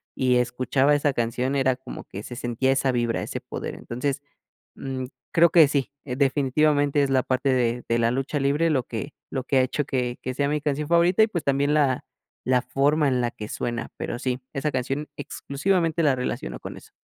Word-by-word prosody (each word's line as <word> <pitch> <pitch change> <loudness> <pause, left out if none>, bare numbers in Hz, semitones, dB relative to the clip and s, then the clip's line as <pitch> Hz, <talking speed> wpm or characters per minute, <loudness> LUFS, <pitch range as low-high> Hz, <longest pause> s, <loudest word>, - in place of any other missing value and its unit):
y 130 -1 +2
escuchaba 130 +3 +2
esa 145 -1 +1
canción 125 +3 -1
era 130 -2 +2
como 130 - -9
que 100 - -8
se 120 - -8
sentía 120 +3 0
esa 135 -1 +1
vibra, 120 -2 0
ese - - -4
poder. - - -6
Entonces, 135 +4 -3 0.5
mm, 130 -1 -4 0.3
creo 170 0 +5
que 160 -4 +7
sí, 140 -3 -1
definitivamente 145 +2 +2
es 135 - 0
la 130 -1 +2
parte 130 +1 0
de 120 -1 +1
de 115 0 +1
la 115 0 +2
lucha 135 +3 -1
libre, 145 +4 +2
lo 130 -5 +1
que 120 +6 -6 0.2
lo 130 -1 -3
que 135 - +1
ha - - +6
hecho 130 +2 -1
que 125 -2 -2
que 130 - -3
sea 140 +2 0
mi 150 0 0
canción 150 +1 -2
favorita 175 +5 +5
y - - +4
pues, 175 -7 -4
también 140 +1 +2
la 140 -4 +2 0.4
la 125 -1 +3
forma 140 +4 +2
en 125 -2 +1
la 120 0 0
que 105 - -8
suena 120 -1 -3
pero 120 - -4
sí 130 0 -2
esa 150 +1 -1
canción 135 +4 -2
exclusivamente 165 +4 -1
la 145 -3 +4
relaciono 60 - -4
con - - -8
eso. - - -15
135 Hz, 205 wpm, -25 LUFS, 125-145 Hz, 0.5 s, que